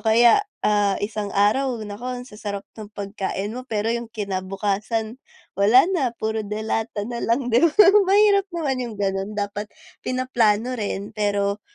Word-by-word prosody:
kaya, 235 Hz, -, +5 dB, 0.2 s
ah, 205 Hz, -2 st, +2 dB
isang 210 Hz, -1 st, -4 dB
araw, 240 Hz, +6 st, +2 dB
naku, 210 Hz, +4 st, -7 dB
ang 250 Hz, -1 st, -5 dB
sasarap 205 Hz, -3 st, -6 dB
ng 215 Hz, -2 st, -8 dB
pagkain 200 Hz, 0 st, -4 dB
mo, 255 Hz, +2 st, -7 dB
pero 220 Hz, +1 st, 0 dB
yung 235 Hz, -1 st, -4 dB
kinabukasan, 210 Hz, +3 st, -3 dB, 0.4 s
wala 215 Hz, +6 st, +7 dB
na, 265 Hz, -9 st, 0 dB
puro 220 Hz, 0 st, -2 dB
delata 215 Hz, 0 st, -3 dB
na 235 Hz, +1 st, -5 dB
lang, 245 Hz, +2 st, 0 dB
'di 235 Hz, -, +5 dB
ba? 335 Hz, -2 st, +4 dB, 0.4 s
Mahirap 400 Hz, 0 st, +4 dB
naman 320 Hz, -7 st, -2 dB
yung 230 Hz, -3 st, -7 dB
gano'n, 195 Hz, +1 st, -2 dB
dapat 205 Hz, 0 st, -3 dB, 0.3 s
pinaplano 245 Hz, -2 st, +1 dB
rin, 205 Hz, -4 st, -4 dB
pero, 205 Hz, -1 st, -1 dB
220 Hz, 150 wpm, -23 LUFS, 205-245 Hz, 0.4 s, wala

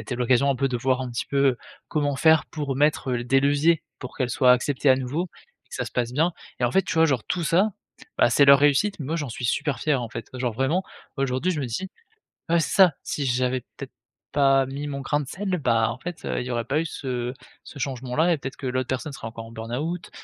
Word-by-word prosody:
été 125 Hz, -, -5 dB
l'occasion 125 Hz, +3 st, +3 dB
un 135 Hz, -, 0 dB
peu, 135 Hz, +2 st, +1 dB
de 125 Hz, -, -1 dB
voir 130 Hz, +2 st, 0 dB
un 125 Hz, -, -5 dB
petit 120 Hz, -, -3 dB
peu, 140 Hz, -3 st, +2 dB, 0.3 s
comment 145 Hz, -3 st, 0 dB
faire, 160 Hz, 0 st, +4 dB
pour 145 Hz, -4 st, -4 dB
mettre 145 Hz, -2 st, +1 dB
des 125 Hz, +3 st, +2 dB
leviers, 145 Hz, +3 st, +3 dB, 0.2 s
pour 125 Hz, -, -8 dB
qu'elle 130 Hz, -3 st, -1 dB
soit 125 Hz, +1 st, +5 dB
acceptée 135 Hz, +2 st, +2 dB
à 130 Hz, -, +6 dB
nouveau 145 Hz, +8 st, -2 dB, 0.4 s
et -, -, -33 dB
que -, -, -8 dB
ça -, -, -2 dB
se -, -, -9 dB
passe 120 Hz, -1 st, -1 dB
bien 160 Hz, +6 st, +2 dB, 0.3 s
et -, -, +2 dB
en 120 Hz, -, +2 dB
fait, 195 Hz, -, +4 dB
tu -, -, -4 dB
vois 160 Hz, 0 st, +5 dB
genre 135 Hz, -6 st, 0 dB
tout 175 Hz, -, -2 dB
ça, 190 Hz, +7 st, +3 dB, 0.5 s
bah, -, -, +5 dB
c'est 140 Hz, -, +5 dB
leur 140 Hz, 0 st, +8 dB
réussite. 145 Hz, +7 st, +2 dB
Moi 155 Hz, +4 st, -2 dB
j'en 145 Hz, -5 st, -3 dB
suis 125 Hz, -, -6 dB
super 135 Hz, +1 st, -1 dB
fier, 150 Hz, -4 st, +1 dB
en 115 Hz, -, -5 dB
fait. 115 Hz, -1 st, -7 dB
Genre 125 Hz, -2 st, -2 dB
vraiment 140 Hz, -, 0 dB, 0.3 s
aujourd'hui, 135 Hz, +5 st, 0 dB
je 150 Hz, -, -3 dB
me 130 Hz, -, -2 dB
dis 185 Hz, +12 st, -4 dB, 0.6 s
ouais 170 Hz, 0 st, +4 dB
c'est -, -, -2 dB
ça! 185 Hz, -5 st, +7 dB
Si 145 Hz, -, -3 dB
j'avais 125 Hz, 0 st, +1 dB, 0.2 s
peut-être 135 Hz, -1 st, -8 dB, 0.4 s
pas 135 Hz, -2 st, +4 dB
mis 140 Hz, +2 st, -5 dB
mon 140 Hz, -1 st, -4 dB
grain 145 Hz, +2 st, 0 dB
de 140 Hz, -, -7 dB
sel, 190 Hz, +2 st, -2 dB
bah, 115 Hz, -4 st, +2 dB
en 120 Hz, -, -8 dB
fait, 175 Hz, +3 st, -7 dB
heu, -, -, -1 dB
il 125 Hz, -, -5 dB
y -, -, -6 dB
aurait 120 Hz, -1 st, -1 dB
pas 145 Hz, +3 st, 0 dB
eu -, -, -3 dB
ce 125 Hz, -5 st, -4 dB, 0.3 s
ce -, -, -11 dB
changement-là 130 Hz, +5 st, 0 dB
et 160 Hz, -, -1 dB
peut-être 135 Hz, -1 st, -6 dB
que 135 Hz, -, -8 dB
l'autre 130 Hz, 0 st, -1 dB
personne 130 Hz, +4 st, -2 dB
serait 135 Hz, -, -7 dB
encore 115 Hz, 0 st, -8 dB
en 115 Hz, -, -12 dB
burn-out. 125 Hz, +10 st, -4 dB
135 Hz, 250 wpm, -24 LUFS, 125-150 Hz, 0.6 s, leur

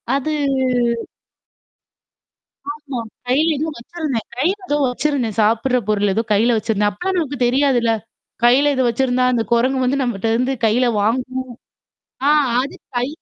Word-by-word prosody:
அது 280 Hz, +3 st, -1 dB, 2.4 s
ஆமா. 290 Hz, -4 st, -5 dB, 0.3 s
கையில 290 Hz, +6 st, +3 dB
ஏதோ 310 Hz, +3 st, -2 dB
வச்சிருந்தேன். 270 Hz, -3 st, -4 dB
கையில 355 Hz, +9 st, +1 dB
ஏதோ 290 Hz, -, +1 dB
வச்சிருந்தேன். 250 Hz, -4 st, -1 dB
சாப்புடுற 230 Hz, +4 st, +2 dB
பொருள் 205 Hz, -1 st, +2 dB
ஏதோ 225 Hz, -, +1 dB
கையில 230 Hz, +3 st, +3 dB
வச்சிருந்தேன். 210 Hz, -1 st, +1 dB
அப்பலாம் 370 Hz, -, -2 dB
நமக்கு 285 Hz, -4 st, -3 dB
தெரியாதுல்ல. 245 Hz, -3 st, +2 dB, 0.5 s
கையில 270 Hz, +4 st, +5 dB
இத 260 Hz, -, +1 dB
வச்சிருந்தா, 250 Hz, +1 st, +1 dB
அந்த 230 Hz, -2 st, +1 dB
குரங்கு 255 Hz, +2 st, +2 dB
வந்து 275 Hz, +3 st, +1 dB
நம்மட்ட 225 Hz, -3 st, -2 dB
இருந்து 255 Hz, +3 st, 0 dB
கையில 235 Hz, +4 st, +3 dB, 0.2 s
வாங்கும். 255 Hz, +4 st, -1 dB, 0.9 s
ஆ -, -, +5 dB, 0.3 s
அது 275 Hz, -, -6 dB, 0.2 s
கை 245 Hz, +2 st, 0 dB
255 Hz, 130 wpm, -19 LUFS, 230-280 Hz, 2.4 s, கையில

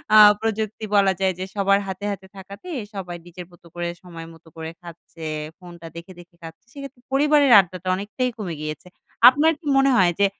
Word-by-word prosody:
আ -, -, +9 dB, 0.2 s
প্রযুক্তি 220 Hz, -1 st, -3 dB
বলা 195 Hz, -1 st, +4 dB
যায় 190 Hz, -1 st, +1 dB
যে 185 Hz, -, -3 dB
সবার 200 Hz, 0 st, +2 dB
হাতে, 190 Hz, +2 st, -6 dB
হাতে 190 Hz, -1 st, -8 dB
থাকাতে, 200 Hz, -, -11 dB, 0.2 s
সবাই 180 Hz, -3 st, -6 dB
নিজের 175 Hz, 0 st, -10 dB
মতো 175 Hz, 0 st, -19 dB
করে 175 Hz, 0 st, -3 dB, 0.2 s
সময় 165 Hz, -2 st, -10 dB
মতো 165 Hz, 0 st, -20 dB
করে 160 Hz, 0 st, -7 dB
খাচ্ছে, 170 Hz, -1 st, -12 dB, 0.3 s
ফোনটা 175 Hz, -2 st, -12 dB
দেখে 170 Hz, +3 st, -10 dB
দেখে 175 Hz, 0 st, -17 dB
খাচ্ছে। 165 Hz, +5 st, -12 dB
সেক্ষেত্রে 275 Hz, -3 st, -10 dB
পরিবারের 290 Hz, -1 st, +4 dB
আড্ডাটা 185 Hz, 0 st, -3 dB
অনেকটাই 210 Hz, +6 st, -3 dB
কমে 180 Hz, -6 st, -5 dB
গিয়েছে। 155 Hz, +3 st, -6 dB, 0.4 s
আপনার 300 Hz, +5 st, +2 dB
কি 310 Hz, -, -11 dB
মনে 270 Hz, 0 st, +4 dB
হয়? 180 Hz, -2 st, +4 dB
যে 200 Hz, -, +5 dB
190 Hz, 185 wpm, -22 LUFS, 175-215 Hz, 0.4 s, আ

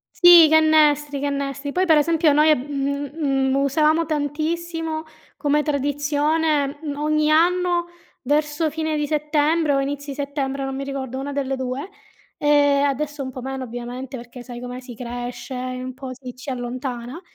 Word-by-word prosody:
Sì, 350 Hz, -2 st, +9 dB
i -, -, +2 dB
cannestri, 300 Hz, -2 st, +4 dB
i -, -, -5 dB
cannestri. 280 Hz, 0 st, -3 dB
Poi, 370 Hz, +3 st, +1 dB
per 320 Hz, -3 st, +5 dB
esempio, 320 Hz, +1 st, +3 dB
noi, 305 Hz, +1 st, +5 dB
mhmm, 280 Hz, +1 st, -3 dB
mhmm, 270 Hz, -4 st, 0 dB
usavamo 305 Hz, +4 st, +2 dB
tantissimo 315 Hz, +2 st, -2 dB, 0.3 s
come 295 Hz, 0 st, +2 dB
tradizione, 290 Hz, +1 st, 0 dB
mhmm, 290 Hz, -2 st, -4 dB
ogni 305 Hz, +1 st, +1 dB
anno, 350 Hz, +2 st, +3 dB, 0.4 s
verso 300 Hz, +3 st, +1 dB
fine 315 Hz, 0 st, -2 dB
di 295 Hz, -, 0 dB
settembre 300 Hz, +1 st, +1 dB
o 275 Hz, -, +2 dB
inizi 285 Hz, +1 st, -3 dB
settembre, 280 Hz, -1 st, -3 dB
non 270 Hz, -, -4 dB
mi 275 Hz, -, -4 dB
ricordo, 265 Hz, -2 st, -5 dB
una 285 Hz, +1 st, -4 dB
delle 270 Hz, -1 st, -1 dB
2, 260 Hz, +5 st, -4 dB, 0.5 s
ehm, 285 Hz, -1 st, +4 dB
adesso 290 Hz, +1 st, -2 dB
un 260 Hz, -1 st, -4 dB
po' 255 Hz, -, -8 dB
meno, 265 Hz, +1 st, -4 dB
ovviamente, 245 Hz, +2 st, -6 dB
perché, 240 Hz, +1 st, -10 dB
sai 240 Hz, -1 st, -8 dB
com'è, 250 Hz, 0 st, -6 dB
si 250 Hz, -2 st, -10 dB
cresce 245 Hz, +1 st, -6 dB
e 255 Hz, 0 st, -4 dB
un 255 Hz, 0 st, -6 dB
po' 265 Hz, 0 st, -8 dB
si 255 Hz, -1 st, -10 dB
ci 255 Hz, +2 st, -8 dB
allontana. 250 Hz, +3 st, -5 dB
285 Hz, 165 wpm, -22 LUFS, 265-305 Hz, 0.5 s, Sì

